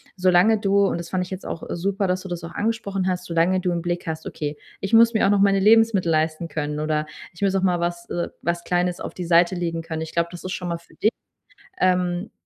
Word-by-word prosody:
solange 185 Hz, +4 st, +4 dB
du- 200 Hz, 0 st, +3 dB
und -, -, -1 dB
das 170 Hz, -1 st, -7 dB
fand 185 Hz, -1 st, 0 dB
ich 180 Hz, -, -9 dB
jetzt 190 Hz, 0 st, -7 dB
auch 165 Hz, -, -5 dB
super, 195 Hz, +3 st, -1 dB
dass 185 Hz, 0 st, 0 dB
du 190 Hz, -, -8 dB
das 175 Hz, -1 st, -5 dB
auch 170 Hz, 0 st, -8 dB
angesprochen 205 Hz, -4 st, -1 dB
hast- 180 Hz, -1 st, -1 dB
solange 170 Hz, +2 st, +2 dB
du 180 Hz, -1 st, -1 dB
im 170 Hz, -1 st, -2 dB
Blick 175 Hz, -1 st, -3 dB
hast: 160 Hz, 0 st, -4 dB
„Okay, 150 Hz, -1 st, -4 dB, 0.2 s
ich 195 Hz, -, -5 dB
muss 230 Hz, +1 st, +7 dB
mir 220 Hz, -, +3 dB
auch -, -, +3 dB
noch 205 Hz, 0 st, +3 dB
meine 195 Hz, 0 st, +4 dB
Lebensmittel 215 Hz, -3 st, +4 dB
leisten 155 Hz, +1 st, 0 dB
können 150 Hz, -1 st, -3 dB
oder 155 Hz, 0 st, 0 dB, 0.3 s
ich 170 Hz, -, -15 dB
muss 195 Hz, -1 st, +2 dB
auch 195 Hz, -, +1 dB
mal 180 Hz, -2 st, +2 dB
was 175 Hz, 0 st, -3 dB
äh, 175 Hz, -, -2 dB
was 170 Hz, 0 st, -2 dB
Kleines 180 Hz, 0 st, 0 dB
auf -, -, -5 dB
die 180 Hz, -, -5 dB
Seite 170 Hz, +2 st, +4 dB
legen 170 Hz, -2 st, -2 dB
können.“ 160 Hz, -1 st, -5 dB
Ich 160 Hz, -, -6 dB
glaube, 170 Hz, 0 st, 0 dB
das 175 Hz, -, -9 dB
ist 185 Hz, -, -5 dB
schon 180 Hz, -2 st, -4 dB
mal 170 Hz, -, -2 dB
für 170 Hz, -, -22 dB
dich, 215 Hz, -, +2 dB, 0.7 s
ähm, 180 Hz, +1 st, +1 dB
180 Hz, 255 wpm, -23 LUFS, 170-195 Hz, 0.7 s, muss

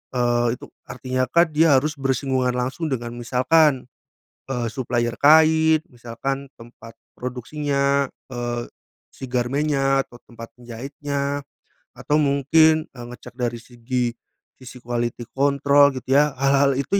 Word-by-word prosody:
eee, 120 Hz, -1 st, +1 dB
itu -, -, -14 dB, 0.2 s
artinya 130 Hz, 0 st, -2 dB
kan 170 Hz, +4 st, +3 dB
dia 155 Hz, -1 st, +4 dB
harus 150 Hz, +2 st, 0 dB
bersinggungan 130 Hz, -1 st, 0 dB
langsung 130 Hz, +6 st, -2 dB
dengan 120 Hz, -4 st, -3 dB
misalkan, 130 Hz, +2 st, +2 dB, 0.5 s
eee, 125 Hz, -3 st, -3 dB
supplier 120 Hz, 0 st, -2 dB
kain 160 Hz, +1 st, +5 dB
misalkan 130 Hz, +3 st, -5 dB
tempat 115 Hz, -1 st, -13 dB, 0.2 s
produksinya, 140 Hz, +2 st, -1 dB, 0.2 s
eee, 120 Hz, -1 st, -4 dB, 0.4 s
si -, -, -9 dB
garmennya 135 Hz, +2 st, 0 dB
atau 120 Hz, -, -17 dB
tempat 115 Hz, -1 st, -12 dB
penjahitnya 140 Hz, +4 st, -5 dB, 0.5 s
atau 150 Hz, +1 st, 0 dB
mungkin, 155 Hz, +3 st, +3 dB
eee, 120 Hz, -2 st, -10 dB
ngecek 125 Hz, 0 st, -11 dB
dari 120 Hz, -1 st, -1 dB
segi 120 Hz, +1 st, -3 dB, 0.5 s
sisi 125 Hz, -1 st, -12 dB
quality 120 Hz, 0 st, -3 dB
control 140 Hz, 0 st, +3 dB
gitu 130 Hz, 0 st, -6 dB
ya. 145 Hz, +1 st, +3 dB
Hal-hal 140 Hz, +1 st, +2 dB
itu 140 Hz, +9 st, 0 dB
130 Hz, 125 wpm, -22 LUFS, 120-145 Hz, 0.5 s, kain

